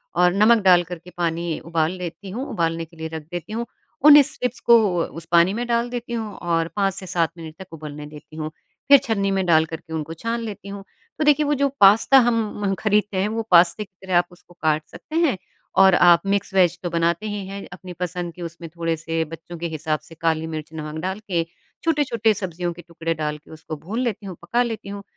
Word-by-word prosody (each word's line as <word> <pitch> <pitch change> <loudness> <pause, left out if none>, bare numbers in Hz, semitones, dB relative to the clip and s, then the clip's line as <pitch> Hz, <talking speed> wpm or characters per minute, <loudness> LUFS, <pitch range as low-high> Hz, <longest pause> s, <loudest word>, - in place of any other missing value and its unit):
और 180 0 +4
नमक 215 +2 +4
डाल 180 -2 +6
करके 175 0 -9
पानी 170 -1 -1
उबाल 165 -1 0
लेती 180 +2 -7
हूँ, 245 +8 -4
उबालने 165 -1 -1
के 165 0 -21
लिए 160 0 -4
रख 160 -1 -7
देती 175 +4 -6
हूँ। 235 +2 -2 0.4
उन्हीं 295 -1 +10
स्ट्रिप्स 250 -3 -4
को 235 - +10 0.3
उस 165 0 -8
पानी 170 +2 +5
में 235 +3 -2
डाल 235 0 +1
देती 240 -1 -5
हूँ 220 -3 -3
और 165 -1 0
5 195 -2 +1
से 190 - -8
7 170 -3 0
मिनट 160 -1 -9
तक 190 -3 -11
उबलने 150 -1 -8
देती 150 +1 -13
हूँ, 155 0 -3 0.4
फिर 280 - +10
छन्नी 200 -6 0
में 190 -1 0
डाल 160 -2 +4
करके 160 0 -8
उनको 160 0 -4
छान 230 +8 -3
लेती 205 -3 -7
हूँ। 200 0 -7 0.4
तो 310 - +2
देखिए, 295 0 +4
वो 295 - +1
जो 280 0 +2
पास्ता 210 +7 +7
हम 240 -2 +4 0.3
म 195 - +1
खरीदते 210 -2 +1
हैं 190 +2 +1
वो 225 +1 -2
पास्ते 175 +4 +5
की 200 - -19
तरह 185 -2 +2
आप 175 - +3
उसको 175 0 -19
काट 155 -1 +2
सकते 310 - -10
हैं 325 - +2 0.4
और 190 -2 +7
आप 175 -1 +6
मिक्स 200 0 -1
वेज़ 180 -3 +3
तो 175 - -1
बनाते 170 +3 0
ही 205 -2 -4
हैं, 200 0 -7
अपनी 180 0 -9
पसंद 175 -1 -4
कि 180 - -12
उसमें 170 0 -7
थोड़े-से 165 -1 -1
बच्चों 165 +2 -10
के 170 - -3
हिसाब 155 -1 -2
से 165 - -16
काली 160 -1 +1
मिर्च 155 -1 -6
नमक 155 0 -6
डाल 190 +3 -3
के, 185 -6 -1 0.4
छोटे-छोटे 255 -9 +2
सब्जियों 175 -3 -4
के 175 - -11
टुकड़े 165 -1 -4
डाल 150 -1 -3
के 150 - -19
उसको 160 0 -7
भून 200 +11 -5
लेती 225 -5 -2
हूँ, 185 -3 -6
पका 235 +9 +1
लेती 225 -4 -5
हूँ, 200 0 -7
180 Hz, 225 wpm, -22 LUFS, 165-210 Hz, 0.4 s, उन्हीं